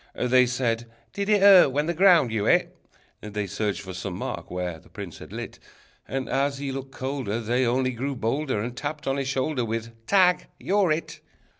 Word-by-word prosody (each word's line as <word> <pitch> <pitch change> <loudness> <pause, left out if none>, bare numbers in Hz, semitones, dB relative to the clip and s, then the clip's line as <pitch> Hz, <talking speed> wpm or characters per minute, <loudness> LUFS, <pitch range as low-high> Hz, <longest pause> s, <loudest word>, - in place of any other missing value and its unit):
They 125 0 +3
said: 120 -2 -1 0.3
"Did 200 +1 -3
it 210 -2 +4
hurt 195 -8 +8
when 145 +3 0
the 170 - -1
ground 170 - +5
you 110 -2 -1
hit?" - - +2 0.5
They 105 -1 -4
searched 100 +1 -2
for 95 -1 -8
some 95 0 -5
mark - - -5
where 90 -2 -4
the - - -21
prince - - -8
had - - -11
lit, - - -7 0.5
And 135 -1 -3
as 140 +1 0
he 140 -1 -4
looked 135 0 -6
colder, 130 -4 -3
They 120 +2 +1
only 130 +2 +1
grew 135 +3 -3
bolder, 130 +1 -1
And 120 +1 -5
tapped 150 +3 -5
on 135 0 0
his 135 -1 -2
shoulder 130 0 -1
With: 115 0 -3 0.2
"Tag! 185 -2 +4
You're 195 -3 +2
It!" 155 +2 -3
130 Hz, 195 wpm, -25 LUFS, 115-150 Hz, 0.5 s, hurt